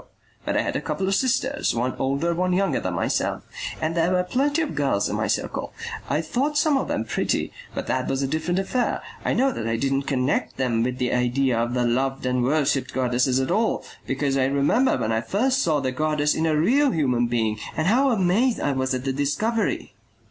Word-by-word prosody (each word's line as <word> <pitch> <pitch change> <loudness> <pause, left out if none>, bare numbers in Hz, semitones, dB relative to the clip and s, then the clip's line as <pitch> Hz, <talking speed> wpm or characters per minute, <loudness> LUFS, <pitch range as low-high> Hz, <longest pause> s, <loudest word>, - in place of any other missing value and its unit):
But - - 0
I - - +2
had - - -3
a - - 0
couple 190 - -2
of 195 - +1
sisters, 260 - +1
one 125 +2 0
older, 140 +6 0
one 180 +1 0
younger 195 +2 +1
than - - -3
myself, - - -1 0.4
and 155 +1 -1
there 170 +1 +1
were 180 0 +2
plenty 285 - +1
of 305 - -4
girls 135 -8 +1
in - - -2
my - - 0
circle. - - -2 0.4
I 155 - +1
thought 280 - -1
some 295 -1 +3
of 270 - 0
them 110 - -1
pretty - - -1 0.2
but - - -3
that 130 0 -1
was 135 +1 -1
a - - 0
different 160 +5 -1
affair. 220 +6 -1 0.2
I - - +1
know 270 +2 +3
that 115 - -4
I 115 - 0
didn't 135 +3 -1
connect 130 0 0
them 120 -4 +1
with 125 +2 -1
the 125 -1 0
idea 125 +1 +1
of 120 +1 -1
the 125 -1 +1
loved 130 +2 0
and 125 0 +1
worshipped 135 -1 +1
goddesses 125 0 +2
at 130 +4 -1
all, 220 +4 +1 0.2
because 135 0 0
I 130 - +3
remember 140 - +2
when 110 - -1
I 110 0 +1
first 255 - +1
saw 155 - +2
the 130 -2 -1
goddess 150 +2 +1
in 160 - 0
a 155 -1 +2
real 270 - +3
human 125 - +1
being 110 -2 0 0.2
and 155 - 0
how 255 +9 +4
amazed 225 +3 +2
I 145 - 0
was 130 -1 0
at 130 +1 -5
the 135 - 0
discovery.... 145 - -1
145 Hz, 220 wpm, -24 LUFS, 130-195 Hz, 0.4 s, how